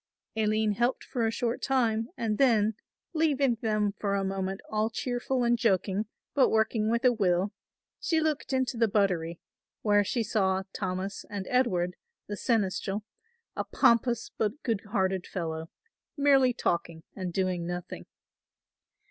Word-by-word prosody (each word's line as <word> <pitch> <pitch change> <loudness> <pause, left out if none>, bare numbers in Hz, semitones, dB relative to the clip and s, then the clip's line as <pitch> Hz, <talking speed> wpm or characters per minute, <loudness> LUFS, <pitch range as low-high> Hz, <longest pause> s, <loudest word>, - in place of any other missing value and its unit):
Aline 215 0 +2
helped 240 +5 0
for 235 -4 -1
a - - 0
short 235 +1 -2
time 230 -4 +1
and 220 -2 -1
then, 225 -5 +4 0.4
leaving 285 -5 +2
them 215 -2 +1
for 200 -1 0
a 195 - 0
moment 195 0 -2
all 215 +1 0
cheerful 245 +2 -1
and 240 0 +2
joking 200 -2 +1 0.3
but 275 - +4
working 220 0 +2
with 235 +3 +1
a 250 - +6
will, 190 -2 +1 0.5
she 325 - +1
looked 310 -3 -1
into 260 -2 0
the 230 0 +4
buttery, 180 -5 +1 0.4
where 205 -1 +4
she 235 +3 -1
saw 190 -3 +1
Thomas 190 +1 -3
and 200 -2 -4
Edward, 185 -9 +2 0.3
the 205 - -3
seneschal, 205 -2 0 0.5
a - - -1
pompous 235 0 +2
but 220 +6 -1
good 225 -4 0
hearted 190 -3 0
fellow, 160 -3 -4 0.5
merely 275 -3 +5
talking 170 -7 -2
and 185 -3 -4
doing 180 -2 -1
nothing. 175 0 -6
215 Hz, 145 wpm, -29 LUFS, 190-240 Hz, 0.5 s, a